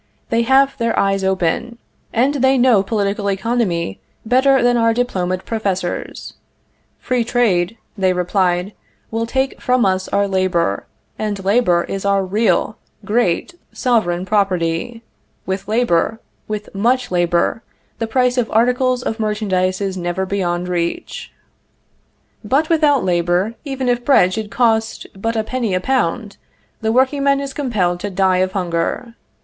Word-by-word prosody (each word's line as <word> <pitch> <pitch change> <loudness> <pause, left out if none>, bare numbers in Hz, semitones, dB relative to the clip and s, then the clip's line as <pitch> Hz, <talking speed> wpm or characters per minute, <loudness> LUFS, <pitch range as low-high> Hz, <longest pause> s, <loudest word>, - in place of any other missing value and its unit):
They 230 0 +3
have 270 +3 +3
their 230 -1 0
eyes 195 0 +1
open, 190 +5 -1 0.3
and 260 +5 +2
they 265 -1 +3
know 245 -5 +4
political 200 0 -1
economy 195 - -1 0.3
better 260 +2 +3
than 245 0 +3
our 230 -1 +2
diplomaed 185 -7 -1
professors. 195 -5 -3 0.6
Free 250 -2 -1
trade, 225 -5 +1 0.2
they 190 -3 +2
replied, 180 +1 0 0.4
will 225 +1 -2
take 265 +2 -1
from 250 -2 +2
us 190 0 0
our 200 0 +1
labor, 185 - 0 0.3
and 205 -3 -3
labor 195 -5 +3
is 195 - -5
our 200 -1 +1
real, 215 +2 0 0.3
great, 215 - 0 0.2
sovereign 190 -8 0
property; 190 +2 -1 0.4
with 190 +1 -3
labor, 225 -2 +1 0.3
with 210 -1 -5
much 245 +5 +1
labor, 175 +4 +1 0.4
the 225 - -1
price 250 +2 +1
of 230 - -1
articles 250 +2 +2
of 225 -1 -3
merchandise 200 -3 0
is 195 -1 -2
never 175 +1 -2
beyond 180 -2 -2
reach. 175 - -3 1.1
But 275 +9 +1
without 300 -6 +3
labor, 175 +4 +1
even 270 -3 -3
if 245 0 +1
bread 185 -9 +4
should 215 0 -4
cost 225 -1 0
but 225 +4 -3
a 220 - 0
penny 230 -4 -2
a - - +1
pound, 215 -2 -1 0.4
the 220 0 0
workingman 275 +3 +2
is 275 -1 -5
compelled 205 -12 -1
to 205 - -4
die 190 -1 +2
of 185 +1 0
hunger. 180 +6 -2
210 Hz, 140 wpm, -18 LUFS, 185-245 Hz, 1.1 s, know